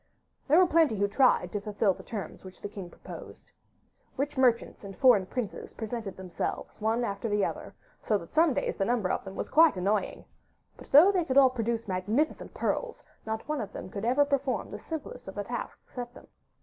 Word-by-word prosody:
There 300 +3 +5
were 370 - +7
plenty 325 -8 +3
who 200 0 +1
tried 255 +6 +3
to 205 - -3
fulfil 205 -1 +1
the - - -12
terms 215 -4 -7
which 185 -1 -12
the - - -5
king 195 -3 -8
proposed. - - -11 0.7
Rich 285 +2 -2
merchants 250 -5 +2
and 195 -1 -9
foreign 245 -9 +5
princes 245 -3 -5
presented 220 -3 -5
themselves 185 +3 -5
one 225 +3 +1
after 220 +1 -3
the 205 -1 +2
other, - - -6 0.3
so 215 - +1
that 170 -4 -11
some 315 -3 +4
days - - -1
the 195 - +1
number 225 -5 +1
of - - -1
them 195 0 -9
was - - -3
quite 320 - +6
annoying; 200 +3 -1 0.5
but, - - -14
though 315 +8 +8
they 370 -3 +1
could 270 -4 -1
all 265 -2 +7
produce 230 -2 -2
magnificent 210 +11 -1
pearls, - - -2 0.2
not 220 0 -3
one 300 -3 -1
of 205 -2 -6
them 185 - -7
could 200 - -5 0.3
perform 275 -2 -1
even - - -14
the - - -6
simplest 320 -10 -7
of 190 - -7
the 205 - -2
tasks 235 +3 -7
set 245 -1 -6
them. - - -13
225 Hz, 205 wpm, -29 LUFS, 200-275 Hz, 0.7 s, though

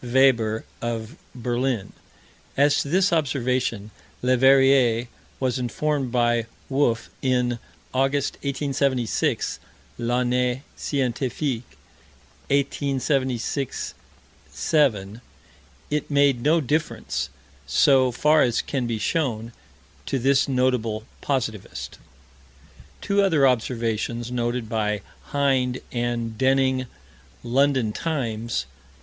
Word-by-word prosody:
Weber, 120 -3 +3 0.2
of 115 +2 -4 0.2
Berlin. 120 -3 -1 0.6
As 145 +1 +4
to 140 - -5
this 185 +3 +3
observation, 125 -7 0 0.3
Leverrier 130 -2 +4 0.3
was 130 -1 0
informed 135 +1 -1
by 120 -2 +2 0.2
Wolf, 130 -4 +1
in 125 -2 +1 0.3
August, 135 +2 +1
1876 140 -3 0 0.4
(L'Année 125 +2 0
Scientifique, 130 -1 -2 0.7
1876 135 -2 -1 0.6
7). 110 - +1 0.7
It 150 0 -1
made 140 -4 +3
no 155 +6 +4
difference, 145 - -2 0.4
so 130 -3 +4
far 150 +5 +4
as 120 -2 +2
can 130 -4 -2
be 115 -2 -2
known, 120 -9 -1 0.6
to 135 - 0
this 135 +2 +3
notable 125 -5 0 0.2
positivist. 115 -7 -3 1.0
Two 200 0 +2
other 160 -8 +4
observations 115 -1 -1
noted 120 -1 -1
by 105 -2 -1 0.2
Hind 130 -3 +1
and 120 -2 -2
Denning 130 -1 +2 0.6
London 130 -3 +2
Times, 115 - -2
Nov. 65 0 -28
125 Hz, 90 wpm, -24 LUFS, 115-140 Hz, 1.0 s, As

